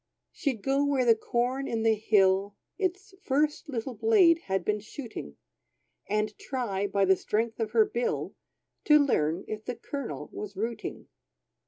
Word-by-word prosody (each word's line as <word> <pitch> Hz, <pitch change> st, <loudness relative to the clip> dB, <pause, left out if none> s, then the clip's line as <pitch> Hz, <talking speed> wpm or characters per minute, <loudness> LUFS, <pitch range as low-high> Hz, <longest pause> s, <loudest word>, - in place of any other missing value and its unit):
She'd 255 Hz, -8 st, -3 dB
go 275 Hz, +1 st, +2 dB
where 280 Hz, -3 st, +2 dB
the 230 Hz, -, +7 dB
corn 245 Hz, +4 st, -1 dB
in 225 Hz, -1 st, -1 dB
the 225 Hz, 0 st, +4 dB
hill, 200 Hz, -2 st, +2 dB, 0.2 s
Its 380 Hz, +1 st, -2 dB
first 295 Hz, +3 st, 0 dB
little 250 Hz, -1 st, -3 dB
blade 365 Hz, -, +5 dB
had 190 Hz, -2 st, -1 dB
been 210 Hz, 0 st, +1 dB
shooting, 215 Hz, -, -8 dB, 0.7 s
And 215 Hz, 0 st, 0 dB
try, 205 Hz, -7 st, -2 dB
by 200 Hz, 0 st, +2 dB
the 190 Hz, 0 st, +5 dB
strength 225 Hz, +4 st, -2 dB
of 225 Hz, -2 st, -1 dB
her 225 Hz, -2 st, +6 dB
bill, 240 Hz, +3 st, -2 dB, 0.5 s
To 300 Hz, -, +7 dB
learn 180 Hz, -, +1 dB
if 215 Hz, 0 st, -5 dB
the 250 Hz, -, -3 dB
kernel 275 Hz, +2 st, -6 dB
was 205 Hz, -2 st, -7 dB
rooting. 230 Hz, +3 st, -4 dB
230 Hz, 155 wpm, -28 LUFS, 205-275 Hz, 0.7 s, the